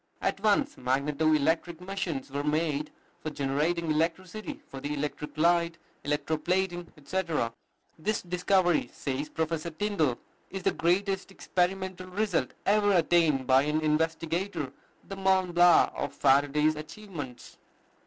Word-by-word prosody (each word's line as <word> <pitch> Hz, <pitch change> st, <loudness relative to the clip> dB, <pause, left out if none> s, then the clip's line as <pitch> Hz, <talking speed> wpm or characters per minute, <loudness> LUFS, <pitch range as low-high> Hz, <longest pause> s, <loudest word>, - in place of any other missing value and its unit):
At -, -, -1 dB
once 215 Hz, +8 st, +2 dB
magneto 140 Hz, +5 st, +1 dB
electric 160 Hz, +3 st, +1 dB
machines 180 Hz, -8 st, -4 dB
were 140 Hz, +1 st, -2 dB
made 150 Hz, 0 st, 0 dB, 0.3 s
for 155 Hz, -, -4 dB
generating 155 Hz, +4 st, 0 dB
electricity 185 Hz, -, -2 dB
for 135 Hz, -, -8 dB
the 145 Hz, +1 st, -3 dB
electric 150 Hz, +1 st, -4 dB
light, 170 Hz, +1 st, +3 dB, 0.3 s
electro 150 Hz, +2 st, -1 dB
plating, 175 Hz, +1 st, -1 dB
etc. 155 Hz, -6 st, -1 dB, 0.5 s
This 210 Hz, +6 st, -1 dB
discovery, 180 Hz, 0 st, +2 dB
says 140 Hz, +2 st, -3 dB
Professor 160 Hz, +1 st, -2 dB
Tyndall, 160 Hz, -, 0 dB, 0.3 s
"is 195 Hz, -1 st, -6 dB
the -, -, +3 dB
greatest 195 Hz, +3 st, 0 dB
experimental 185 Hz, -1 st, -2 dB
result 185 Hz, -, -1 dB
ever 205 Hz, 0 st, +4 dB
attained 165 Hz, -6 st, +3 dB
by 130 Hz, +1 st, +5 dB
an 150 Hz, +2 st, 0 dB
investigator, 160 Hz, 0 st, -1 dB, 0.3 s
the 195 Hz, -, -6 dB
Mont 190 Hz, -2 st, +2 dB
Blanc 175 Hz, 0 st, +6 dB
of -, -, -3 dB
Faraday's 145 Hz, +3 st, +3 dB
achievements." 155 Hz, -, -8 dB
165 Hz, 125 wpm, -29 LUFS, 150-185 Hz, 0.5 s, Blanc